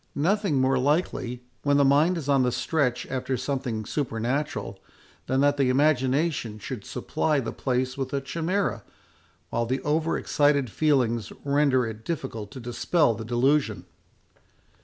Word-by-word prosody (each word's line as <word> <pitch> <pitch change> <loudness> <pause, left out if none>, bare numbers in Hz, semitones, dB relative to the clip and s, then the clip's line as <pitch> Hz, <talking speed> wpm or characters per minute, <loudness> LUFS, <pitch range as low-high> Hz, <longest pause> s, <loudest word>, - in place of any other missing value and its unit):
Nothing 185 -1 +1
more 130 0 +2
likely, 135 -4 0 0.2
when 145 0 +2
the 140 - +5
mind 150 +6 +4
is 150 -4 -5
on 140 -2 +4
the 125 -1 +2
stretch 125 0 0
after 130 0 -2
something 130 -4 -3
supernatural, 120 -4 -2 0.5
than 130 +1 +1
that 145 0 +3
the 135 -2 +2
imagination 135 -3 +1
should 110 0 -6
supply 150 -2 -1
the 115 -4 -3
place 130 +1 -2
with 130 -1 -3
a 140 - 0
chimera, 170 +8 -2 0.7
while 115 0 0
the 130 +3 0
over 155 +2 +1
excited 145 -5 +2
feelings 125 -8 +1
render 140 -3 +3
it 110 0 -7
difficult 120 -10 -4
to 130 - -9
dispel 120 +3 +1
the 115 - -6
delusion." 120 -4 +1
135 Hz, 145 wpm, -26 LUFS, 120-145 Hz, 0.7 s, the